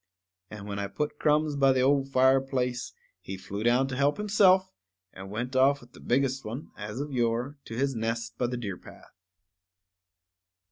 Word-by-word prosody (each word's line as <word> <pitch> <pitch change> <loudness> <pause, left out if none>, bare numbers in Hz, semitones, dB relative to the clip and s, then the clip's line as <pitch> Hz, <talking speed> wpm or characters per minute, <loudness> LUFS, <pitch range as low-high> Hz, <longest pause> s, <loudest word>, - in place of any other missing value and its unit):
_ - - -61 0.5
And 100 - -9
when 100 -1 -4
I 100 - -2
put 150 +8 -4
crumbs 150 0 +2
by 135 -1 +4
the 130 - +2
old 135 +1 +2
fireplace, 130 -1 +1 0.3
he 95 - -7
flew 100 +2 -6
down 120 +4 +3
to 130 - -4
help 140 +2 +2
himself, 190 -2 +4 0.4
and 95 0 -9
went 120 +5 -4
off 135 +2 +4
with 120 -1 -18
the - - -14
biggest 135 +1 0
one, 120 +7 -7
as 105 +3 -6
of 145 +1 -4
yore, 120 +3 -1
to 115 - -7
his 135 +1 +1
nest 115 0 -3
by 125 - +1
the 125 +1 -3
deer 100 -6 -5
path. - - -15
130 Hz, 185 wpm, -28 LUFS, 115-140 Hz, 0.5 s, by